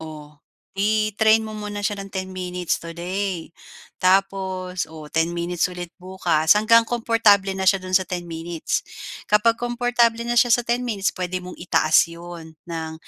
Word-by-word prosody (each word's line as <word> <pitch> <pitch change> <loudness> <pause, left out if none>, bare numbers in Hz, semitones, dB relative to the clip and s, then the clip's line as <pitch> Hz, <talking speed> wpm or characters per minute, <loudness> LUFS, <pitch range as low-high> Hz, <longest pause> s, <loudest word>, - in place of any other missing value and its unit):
oh, 150 -1 -11 0.4
i-train 215 +1 +3
mo 215 -1 -7
muna 205 0 -5
siya 205 0 -1
ng 195 - -6
10 190 0 -4
minutes 180 -1 -3
today, 175 +1 -4 0.5
tapos 185 -1 0
o 155 -1 -11
10 165 +1 0
minutes 175 0 -1
ulit 175 -1 -7
bukas 180 -2 +2
hanggang 230 +2 +4
komportable 225 -4 +3
na 190 0 -3
siya 195 0 +4
do'n 185 0 +3
sa 190 - -6
10 180 -1 -4
minutes. 165 0 -3 0.4
Kapag 225 +2 +3
komportable 240 -1 +1
na 240 0 0
siya 240 -1 +5
sa 240 - 0
10 240 +1 -1
minutes, 200 -4 0
puwede 180 0 -4
mong 180 - -10
itaas 160 -2 +3
'yon, 170 -1 -10 0.2
ng 160 -1 -4
185 Hz, 160 wpm, -22 LUFS, 170-215 Hz, 0.5 s, siya